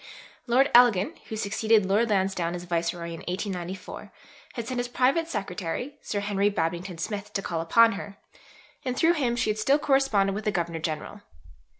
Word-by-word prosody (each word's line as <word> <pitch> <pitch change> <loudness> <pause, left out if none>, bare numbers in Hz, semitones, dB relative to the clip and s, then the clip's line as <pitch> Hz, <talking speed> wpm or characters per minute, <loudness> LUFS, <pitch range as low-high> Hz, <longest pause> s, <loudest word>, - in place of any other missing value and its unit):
Lord 260 +4 +3
Elgin, 235 -6 +5
who 220 - -4
succeeded 215 0 +2
Lord 210 +5 +2
Lansdowne 190 -4 0
as 175 - -6
Viceroy 170 0 -2
in 165 -1 -7
1894, 185 0 -5 0.4
had 235 -3 -5
sent 255 -1 -2
his 245 - -1
private 265 +7 +1
secretary, 200 - -4
Sir 205 - -3
Henry 205 0 +1
Babington 175 -1 -2
Smith, 205 +4 -4
to 195 - -1
call 165 -2 -2
upon 230 +8 +5
her, 200 0 -7 0.7
and 255 -2 -3
through 330 +1 +4
him 255 -7 0
she 230 -2 +1
had 215 - -4
still 270 +6 +3
corresponded 270 -9 +2
with 210 +2 -5
the 210 - +2
Governor 170 -3 -2
General. 160 +6 -5
205 Hz, 175 wpm, -26 LUFS, 180-235 Hz, 0.7 s, Elgin